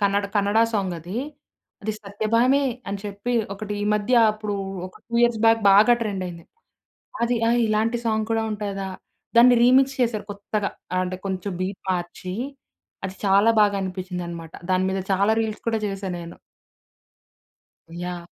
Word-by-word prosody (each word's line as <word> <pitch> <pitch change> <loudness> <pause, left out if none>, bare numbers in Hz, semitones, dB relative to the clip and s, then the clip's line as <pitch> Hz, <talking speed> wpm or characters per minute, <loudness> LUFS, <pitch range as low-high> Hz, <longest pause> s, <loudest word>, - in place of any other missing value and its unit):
Kannada 200 0 +2
Kannada 205 +2 +2 0.2
song 190 -4 0
అది 180 +7 -7 0.8
'సత్యభామే' 230 +7 +1 0.2
అని 200 0 -3
చెప్పి 205 +4 -4 0.2
ఒకటి 210 +1 -6
ఈ - - 0
మధ్య 210 +4 +1 0.2
అప్పుడు 210 -1 -4 0.3
ఒక 185 - -14
2 235 - -8
ఇయర్స్ 235 -2 +3
బ్యాక్ 225 0 +5
బాగా 210 +5 +7
ట్రెండ్ 200 -4 -2
అయింది. 170 -1 -9 0.8
అది 240 +1 +1
ఆహ్, 240 +1 +3
ఇలాంటి 220 +2 +1
సాంగ్ 220 -1 +1
కూడా 225 0 +1
ఉంటదా? 200 -2 -3 0.5
దాన్ని 245 +1 +8
రీమిక్స్ 265 +2 +4
చేశారు 225 -4 0
కొత్తగా. 200 0 -3 0.2
ఆహ్, 185 - +2
అంటే 185 0 -4
కొంచెం 190 0 -3
బీట్ 190 +1 -4
మార్చి 180 +1 -4 0.7
అది 190 0 -6
చాలా 200 +3 +5
బాగా 205 -1 +3
అనిపిచ్చిందనమాట. 180 -3 -5 0.2
దాని 185 0 +2
మీద 190 0 -1
చాలా 200 +3 +3
రీల్స్ 220 -1 -4
కూడా 225 -1 +1
చేశా 195 0 -4
నేను. 170 0 -9 1.7
యాహ్! 175 -1 -5
200 Hz, 145 wpm, -24 LUFS, 190-225 Hz, 1.7 s, దాన్ని